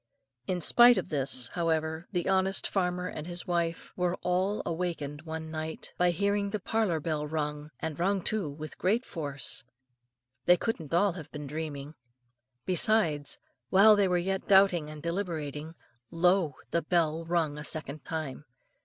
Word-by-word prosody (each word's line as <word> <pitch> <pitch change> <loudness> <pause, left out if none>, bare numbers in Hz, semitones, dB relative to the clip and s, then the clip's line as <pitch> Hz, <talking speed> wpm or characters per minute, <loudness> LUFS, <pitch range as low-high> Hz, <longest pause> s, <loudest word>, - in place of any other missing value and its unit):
In 180 -1 -1
spite 240 +9 +7
of - - -2
this, 135 -4 0
however, 160 -1 -1
the 175 -3 -1
honest 190 0 +2
farmer 180 -2 -1
and 155 -2 -6
his 175 0 -1
family 170 -1 0 0.2
were 180 0 0
all 185 +3 0
awakened 165 -4 -3
one 160 0 -5
night 160 0 -2
by 180 0 +3
hearing 200 +3 0
the 210 +1 -2
parlour 205 -5 0
bell 150 -1 -2
rung, 150 -1 -3
and 160 -1 -4
rung 190 +1 +1
too 210 -8 -1
with 155 +2 -8
great 220 +7 +1
force. 145 -5 -1 0.8
They 180 0 +6
couldn't 170 -10 -3
all 195 +4 +3
have 160 -4 -9
been 150 -1 -6
dreaming. 150 -1 -5 0.7
Besides, 180 -6 +1 0.3
while 210 +3 +7
they 200 -1 +3
were 180 -1 +2
yet 190 +2 -2
doubting 190 -6 +5
and 155 -1 -9
deliberating, 165 -4 -3 0.3
lo! 175 -3 +2 0.2
the 170 - +2
bell 165 -1 +1
rung 165 -3 0
a - - -6
second 155 -1 -4
time. 155 -3 -5
170 Hz, 155 wpm, -29 LUFS, 155-185 Hz, 0.8 s, spite